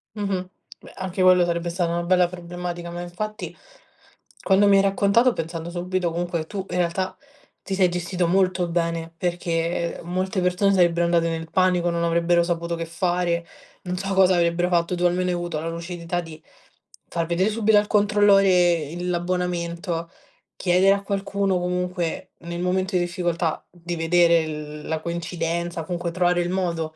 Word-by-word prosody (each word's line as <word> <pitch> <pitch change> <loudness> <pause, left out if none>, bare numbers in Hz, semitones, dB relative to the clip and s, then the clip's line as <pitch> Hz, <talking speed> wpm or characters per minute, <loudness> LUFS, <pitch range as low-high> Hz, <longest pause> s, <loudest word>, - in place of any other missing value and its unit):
Mh-mh. 195 -3 -2 0.3
Beh, - - -14
anche 190 0 -4
quello 185 -1 +6
sarebbe 170 0 -1
stata 170 0 -1
una 170 0 -1
bella 180 0 +3
problematica, 175 -1 -6
ma 175 0 -5
infatti 215 +5 -6 0.9
quando 200 +1 +4
mi 200 - +6
hai 195 - +6
raccontato 200 +5 +3
pensando 165 -1 -5
subito 180 0 -2
comunque 170 -1 -2
tu 195 +1 -5
in - - -2
realtà, 180 +2 -1 0.5
ti 195 - -4
sei 185 -1 +4
gestito 175 0 -1
molto 185 0 +2
bene, 165 -1 -2
perché, 170 -1 -1
ehm, - - -11
molte 185 +2 -1
persone 180 +2 +2
sarebbero 175 -2 +3
andate 170 -1 +2
nel 165 0 -4
panico, 180 -2 +2
non 170 0 -1
avrebbero 170 +1 +2
saputo 170 0 -2
che 165 0 -4
fare, 170 0 -1 0.4
non 180 0 -3
so 195 +1 -2
cosa 190 -1 +5
avrebbero 170 +1 +2
fatto. 175 0 +1
Tu 175 - 0
almeno 180 +1 +1
hai 180 - 0
avuto 175 -3 -3
la 165 - -3
lucidità 170 +1 -4
di 160 -2 -11 0.7
far 165 -1 -2
vedere 175 +5 +1
subito 220 0 +3
al 205 0 +3
controllore 205 -1 +4 0.4
il 175 +1 -4
l'abbonamento, 175 -1 -2 0.5
chiedere 185 +2 +4
a 200 0 -3
qualcuno 200 -1 -1
comunque 180 -1 -2
nel 170 +1 -6
momento 185 +1 0
di 180 - +3
difficoltà, 175 -2 -2
di 175 0 -6
vedere 170 0 +3
l 150 -1 -7
la 160 0 -1
coincidenza 170 +1 -3
o - - -3
comunque 175 0 -3
trovare 175 0 +2
il 175 - -2
modo, 170 -4 -2
175 Hz, 170 wpm, -23 LUFS, 170-185 Hz, 0.9 s, quello